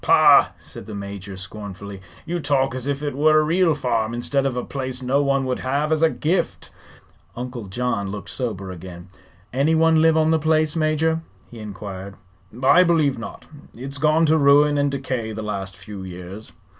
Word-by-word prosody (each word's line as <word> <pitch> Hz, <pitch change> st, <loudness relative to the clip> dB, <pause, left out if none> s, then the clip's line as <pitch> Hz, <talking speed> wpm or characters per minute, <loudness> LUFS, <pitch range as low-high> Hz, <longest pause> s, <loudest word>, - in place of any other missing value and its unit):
"Pah!" -, -, +6 dB
said -, -, -9 dB
the 110 Hz, -, -7 dB
Major, 100 Hz, -1 st, -7 dB
scornfully. 100 Hz, 0 st, -8 dB, 0.2 s
"You 175 Hz, +1 st, -2 dB
talk 135 Hz, -4 st, +1 dB
as 130 Hz, +1 st, -4 dB
if 140 Hz, +1 st, -2 dB
it 145 Hz, -3 st, -3 dB
were 155 Hz, +2 st, +4 dB
a -, -, +3 dB
real 165 Hz, +1 st, +2 dB
farm, 115 Hz, -4 st, -1 dB
instead 135 Hz, +3 st, 0 dB
of 125 Hz, -2 st, -3 dB
a 125 Hz, -, -2 dB
place 130 Hz, -2 st, -4 dB
no 135 Hz, +3 st, +2 dB
one 140 Hz, -1 st, +1 dB
would 130 Hz, -1 st, -2 dB
have 140 Hz, +4 st, -1 dB
as 160 Hz, 0 st, +2 dB
a 165 Hz, -, +5 dB
gift." 165 Hz, +4 st, -2 dB, 0.6 s
Uncle 125 Hz, -3 st, -6 dB
John 100 Hz, -1 st, -2 dB
looked 100 Hz, -2 st, -6 dB
sober 100 Hz, -7 st, -4 dB
again. 90 Hz, 0 st, -10 dB, 0.4 s
"Anyone 160 Hz, +4 st, +3 dB
live 160 Hz, 0 st, +4 dB
on 160 Hz, 0 st, +3 dB
the 160 Hz, -, +3 dB
place, 155 Hz, 0 st, +2 dB
Major?" 160 Hz, +1 st, +1 dB, 0.3 s
he 120 Hz, -, -10 dB
inquired. 100 Hz, -2 st, -7 dB, 0.5 s
"I 170 Hz, +7 st, +7 dB
believe 155 Hz, -7 st, +2 dB
not. -, -, -8 dB, 0.3 s
It's 135 Hz, +3 st, -7 dB
gone 155 Hz, +2 st, +3 dB
to 160 Hz, 0 st, +3 dB
ruin 145 Hz, +1 st, +5 dB
and 145 Hz, 0 st, +2 dB
decay 130 Hz, -5 st, -3 dB
the 110 Hz, +1 st, -5 dB
last 100 Hz, -2 st, -5 dB
few 100 Hz, +1 st, -9 dB
years." 95 Hz, +3 st, -9 dB
130 Hz, 180 wpm, -22 LUFS, 105-155 Hz, 0.6 s, I